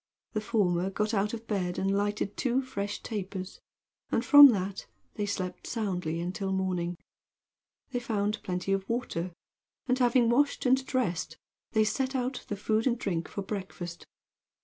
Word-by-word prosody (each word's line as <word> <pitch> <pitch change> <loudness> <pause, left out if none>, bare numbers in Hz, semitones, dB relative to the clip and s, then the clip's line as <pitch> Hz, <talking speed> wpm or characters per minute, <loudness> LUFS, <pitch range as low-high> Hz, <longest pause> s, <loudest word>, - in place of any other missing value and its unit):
The 215 - 0
former 195 -5 +1
got 210 +3 -1
out 205 0 +1
of 230 -1 -6
bed 185 -5 -1
and 195 +1 +1
lighted 205 0 -1
two 260 +1 +1
fresh 205 -5 -4
tapers, 190 -3 -5 0.5
and 230 - +1
from 290 -1 +11
that 195 -5 -1 0.3
they 205 - -2
slept 185 -2 -4
soundly 180 -8 -2
until 185 +3 -3
morning. 180 -2 -1 0.9
They 245 - -1
found 210 -3 -1
plenty 180 +1 -1
of 195 0 -2
water, 205 -7 -2 0.5
and 255 0 +1
having 245 -1 +4
washed 280 +4 +2
and 260 +1 +4
dressed, 235 - -1 0.4
they 220 - +4
set 260 +5 -1
out 255 0 -2
the 205 - -3
food 220 +3 +1
and 245 -1 +2
drink 175 -7 -2
for 200 - -5
breakfast. 185 -4 -6
205 Hz, 155 wpm, -29 LUFS, 185-235 Hz, 0.9 s, from